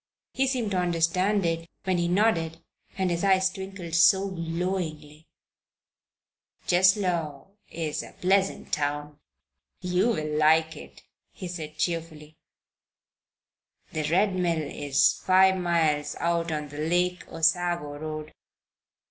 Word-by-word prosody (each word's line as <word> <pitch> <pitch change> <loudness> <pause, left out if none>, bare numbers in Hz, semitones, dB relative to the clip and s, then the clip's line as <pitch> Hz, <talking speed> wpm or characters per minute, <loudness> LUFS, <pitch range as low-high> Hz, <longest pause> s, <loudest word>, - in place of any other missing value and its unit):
He 270 0 +1
seemed 245 -5 -1
to 185 - +1
understand 180 +3 +1
it 165 0 -2
when 185 -2 0
he 170 - +1
nodded 175 -4 +1 0.4
and 190 -2 0
his 170 +1 -2
eyes 190 -1 +3
twinkled 190 -3 -8
so 190 +4 +5
glowingly. 165 -3 -4 1.4
"Cheslow 180 -5 +1 0.2
is 160 -3 -3
a - - -11
pleasant 195 +1 0
town. 145 0 -2 0.6
You 180 +3 +1
will 155 -7 -2
like 160 +1 +3
it," - - -13 0.3
he 185 - -8
said, 160 -3 -7
cheerfully. 160 -3 -4 1.5
"The 155 -1 -2
Red 190 +4 +2
Mill 170 -3 0
is 140 -1 +1
five 190 0 +5
miles 160 -4 0
out 170 -1 0
on 150 -1 -3
the 145 +1 -9
Lake 180 +3 0
Osago 165 -2 0
Road. 155 0 -6
170 Hz, 120 wpm, -26 LUFS, 155-185 Hz, 1.5 s, so